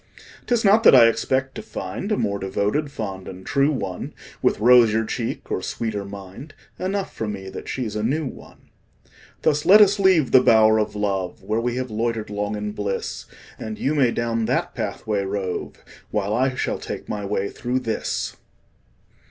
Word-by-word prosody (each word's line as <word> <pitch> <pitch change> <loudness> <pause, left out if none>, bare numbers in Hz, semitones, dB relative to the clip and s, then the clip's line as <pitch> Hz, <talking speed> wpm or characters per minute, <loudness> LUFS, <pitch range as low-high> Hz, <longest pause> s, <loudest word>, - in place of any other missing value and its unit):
'Tis 240 -3 +1
not 205 +3 +6
that 220 - +8
I 120 -2 +9
expect 130 +3 +1
to - - -6
find 100 - -5
A 210 - +2
more 100 0 -1
devoted, 105 +10 -1
fond 95 -7 -6
and 95 0 -9
true 140 +1 +2
one, 95 -10 -4 0.3
With - - +2
rosier 115 -1 +5
cheek 115 +1 -4
or - - -1
sweeter 110 -3 -3
mind 100 +8 -10 0.2
Enough 195 +1 -2
for 110 - -4
me 95 -2 -5
that - - -8
she's 115 -5 -3
a 105 - -1
new 145 +8 0
one. 130 - -11 0.7
Thus 150 -1 +2
let 205 +3 +8
us 205 -1 +5
leave 185 -8 +4
the 130 - +7
bower 110 -2 +5
of 105 -1 -2
love, 95 -3 -2
Where 110 +3 -1
we 120 0 -1
have 130 -2 -3
loitered 110 -1 -2
long 105 +1 -2
in 105 0 -4
bliss; 100 -2 -4 0.3
And 110 -1 -5
you 140 - 0
may 140 -5 +3
down 115 -1 -1
that - - -1
pathway 105 -2 -2
rove, 95 -2 -4 0.3
While 105 0 -1
I 130 +3 +1
shall - - -2
take - - -6
my 105 -1 -4
way 100 0 -1
through 125 +2 -2
this. 115 -3 -3
110 Hz, 180 wpm, -23 LUFS, 105-135 Hz, 0.7 s, I